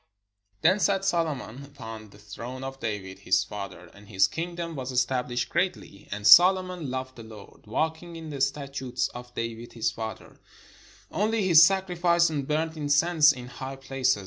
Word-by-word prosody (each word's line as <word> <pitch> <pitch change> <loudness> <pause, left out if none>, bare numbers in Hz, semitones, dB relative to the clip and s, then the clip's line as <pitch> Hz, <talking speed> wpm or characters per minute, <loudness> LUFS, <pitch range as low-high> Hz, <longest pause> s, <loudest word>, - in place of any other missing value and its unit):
Then 185 +5 +4
sat 195 -1 +1
Solomon 150 - -2
upon 115 -6 -10
the 100 - -17
throne 115 +6 -8
of 135 0 -6
David 100 -5 -5
his - - +2
father; 100 -4 -8
and 100 0 -16
his 95 -2 +3
kingdom 170 - -5
was 130 -1 -5
estabHshed 125 -1 -1
greatly. 170 - -3
And 105 0 -5
Solomon 180 - +6
loved 130 0 -5
the 115 - -9
Lord, 110 -1 -14
walking 160 +8 -2
in 160 -2 -8
the 140 -2 -5
statutes 135 -2 -2
of 125 0 -10
David 115 0 -5
his 115 -2 -1
father: 110 -1 -8 0.7
only 215 +1 0
he 185 -2 +1
sacrificed 175 -1 +5
and 140 -3 -3
burnt 160 +2 -1
incense 150 +1 +4
in 125 -1 -8
high 135 +2 -7
places. 135 -2 0
135 Hz, 160 wpm, -27 LUFS, 115-170 Hz, 0.7 s, Solomon